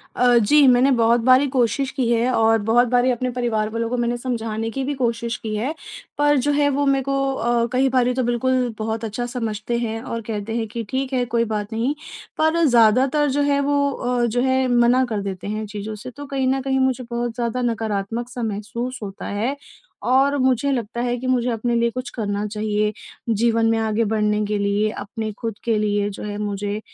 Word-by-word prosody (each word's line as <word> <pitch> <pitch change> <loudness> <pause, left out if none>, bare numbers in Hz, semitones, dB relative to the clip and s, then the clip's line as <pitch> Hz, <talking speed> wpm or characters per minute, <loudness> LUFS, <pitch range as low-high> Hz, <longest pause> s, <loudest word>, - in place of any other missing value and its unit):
अ, 245 -1 +4
जी 280 +7 +5
मैंने 255 +2 +5
बहुत 235 -1 +3
बारी 255 +4 +5
कोशिश 255 0 0
की 260 -4 -1
है 235 +2 +2
और 225 0 +4
बहुत 240 +2 +4
बारी 250 +1 +3
अपने 250 +1 -1
परिवार 235 -3 -1
वालों 230 +1 -2
को 250 - -1
मैंने 240 0 0
समझाने 225 -3 -3
की 270 +4 -3
भी 290 - -2
कोशिश 235 -2 -1
की 215 -1 -4
है, 250 +9 -2 0.4
पर 290 0 +3
जो 290 +3 +1
है 290 0 +2
वो 285 +1 0
मेरे 275 -1 +2
को 275 0 0
अ, 235 -1 +1
कई 265 +1 +3
बारी 250 -1 +2
तो 255 0 0
बिल्कुल 245 0 0
बहुत 220 +1 -3
अच्छा 225 +3 -3
समझते 230 -1 -3
हैं 225 -1 -3
और 230 -1 -5
कहते 215 +1 -3
हैं 225 - -2
कि 230 +1 -5
ठीक 265 0 -2
है 250 -1 +2
कोई 230 0 +1
बात 210 0 -3
नहीं 235 +6 0 0.4
पर 315 +2 +2
ज़्यादातर 255 +4 +4
जो 285 +2 0
है 285 0 +2
वो 280 0 +1
अ, 245 -2 -1
जो 240 +1 0
है 260 0 +2
मना 245 +1 +4
कर 210 -2 -2
देते 195 0 -5
हैं 215 +1 -3
चीज़ों 210 +1 -6
से, 250 +5 -8
तो 285 +3 -9
कहीं 270 -2 -1
न 265 +1 +1
कहीं 265 0 0
मुझे 260 -1 +1
बहुत 235 -1 -2
ज़्यादा 240 +1 -2
नकारात्मक 225 0 -2
सा 245 -1 -5
महसूस 225 +4 -4
होता 195 -1 -7
है 225 +7 -1 0.5
और 275 +2 +3
मुझे 260 +1 +2
लगता 235 -2 -2
है 245 0 -1
कि 255 +2 -5
मुझे 250 -1 +1
अपने 235 +1 -1
लिए 235 0 +2
कुछ 255 +1 -5
करना 205 -2 -2
चाहिए, 210 0 -1 0.4
जीवन 230 +1 +2
में 225 - +1
आगे 220 0 0
बढ़ने 210 0 +1
के 210 0 -1
लिए, 205 +1 +1
अपने 215 +2 -5
खुद 225 -3 -4
के 230 -2 +1
लिए 205 -1 0
जो 200 - -8
है 205 0 -4
मुझे 205 0 -3
235 Hz, 215 wpm, -22 LUFS, 220-255 Hz, 0.5 s, जी